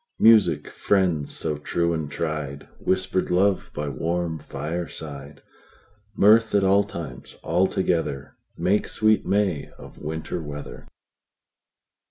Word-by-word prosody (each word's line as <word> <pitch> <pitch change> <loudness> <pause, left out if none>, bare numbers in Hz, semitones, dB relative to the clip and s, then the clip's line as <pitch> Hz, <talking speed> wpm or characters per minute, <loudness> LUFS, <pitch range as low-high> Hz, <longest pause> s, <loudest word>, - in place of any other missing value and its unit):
Music, 95 -10 +5
friends 90 -7 +1
so 75 -2 -2
true 85 +3 0
and 80 -3 -3
tried, 75 -3 -4
Whisper'd 95 0 0
love 95 +2 +2
by 75 0 -3
warm 80 +4 -2
fireside, 75 -4 -6 0.7
Mirth 110 +2 +5
at 100 - +4
all 100 +1 +4
times 80 -10 -8
all 95 +2 +2
together, 80 -8 -1 0.2
Make 100 +3 +1
sweet 110 -1 +2
May 95 -8 +1
of - - -13
Winter 80 +3 -4
weather. 75 -1 -8
85 Hz, 115 wpm, -24 LUFS, 75-95 Hz, 0.7 s, Music